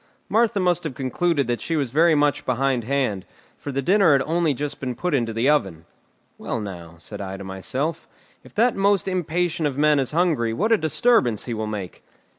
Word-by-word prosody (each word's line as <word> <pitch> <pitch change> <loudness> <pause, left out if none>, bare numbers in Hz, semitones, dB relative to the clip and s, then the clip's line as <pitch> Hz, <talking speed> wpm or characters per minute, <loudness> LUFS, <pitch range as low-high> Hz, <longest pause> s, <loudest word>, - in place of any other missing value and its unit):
Martha 225 -1 +2
must 180 -2 +1
have 155 -6 -5
concluded 140 +3 0
that 120 0 -2
she 165 - -2
was 140 -6 -1
very 160 +3 +4
much 145 -1 +1
behindhand, 130 -4 0 0.3
for 145 - -7
the 140 +1 -2
dinner 190 -1 +4
had 135 -1 +3
only 165 0 +1
just 145 +1 -4
been 125 -2 -4
put 180 +4 -2
into 120 -5 +1
the 115 +4 0
oven. 95 - +1 0.5
"Well, - - -3
now," 85 -5 -8
said 85 - -9
I 95 0 -5
to 100 - -8
myself, 130 - -4 0.4
"if - - -17
that 235 +3 +3
most 195 -1 +2
impatient 175 -3 -1
of 140 -2 -4
men 150 0 +4
is 135 - -1
hungry, 150 -9 +1
what 210 - 0
a 225 - +6
disturbance 160 - +2
he 120 - -4
will 110 -1 -3
make!" 100 -4 -6
140 Hz, 200 wpm, -23 LUFS, 115-170 Hz, 0.5 s, a